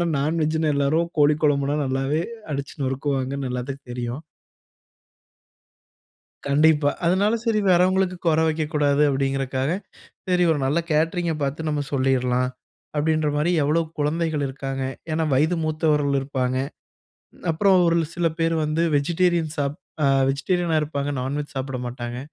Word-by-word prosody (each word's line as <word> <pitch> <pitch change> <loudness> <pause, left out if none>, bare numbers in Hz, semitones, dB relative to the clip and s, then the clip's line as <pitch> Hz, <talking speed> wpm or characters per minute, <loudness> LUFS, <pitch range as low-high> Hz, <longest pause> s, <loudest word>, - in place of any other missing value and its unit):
ஆனா 175 - +2
நான்வெஜ்ஜின்னா 155 +1 +1
எல்லாரும் 160 +5 +1
கோழி 150 0 +5
கொழம்புனா 145 0 +2
நல்லாவே 135 +4 0 0.3
அடிச்சு 140 0 -4
நொறுக்குவாங்கன்னு 135 0 -2
எல்லாத்துக்கும் 130 +1 -5
தெரியும். 120 +4 -4 2.3
கண்டிப்பா. 150 +1 +4 0.2
அதனால 200 +5 +3
சரி, 220 -2 +2
வரவங்களுக்கு 185 +1 +3
குற 160 -1 +4
வெக்க 155 0 0
கூடாது 145 -1 +2
அப்டிங்கிறக்காக, 135 0 -1 0.6
சரி 180 -1 +3
ஒரு 150 - -1
நல்ல 145 +5 +1
கேட்டரிங்க 165 +2 +1
பார்த்து 145 +3 -2
நம்ம 150 -1 0
சொல்லிரலாம், 125 -2 +1 0.5
அப்டின்ற 155 +1 +1
மாரி 150 +4 +1
எவ்வளோ 155 +4 +2 0.2
குழந்தைகள் 150 0 0
இருக்காங்க. 135 0 -4 0.3
ஏன்னா, 160 +1 +1
வயது 160 +6 +2
மூத்தவர்கள் 150 -3 +1
இருப்பாங்க. 130 -2 -2 0.9
அப்புறம் 190 +4 +3
ஒரு 170 0 +3 0.2
சில 170 -1 0
பேர் 165 0 +1
வந்து 155 +2 0
வெஜிடேரியன் 170 +1 +1
சாப் 145 +1 -1 0.3
அ, - - +3 0.2
வெஜிடேரியனா 165 +4 0
இருப்பாங்க, 145 -1 -2
நான்வெஜ் 145 +3 -4
சாப்பட 130 -1 -3
மாட்டாங்க. 120 0 -5
150 Hz, 125 wpm, -23 LUFS, 135-160 Hz, 2.3 s, கோழி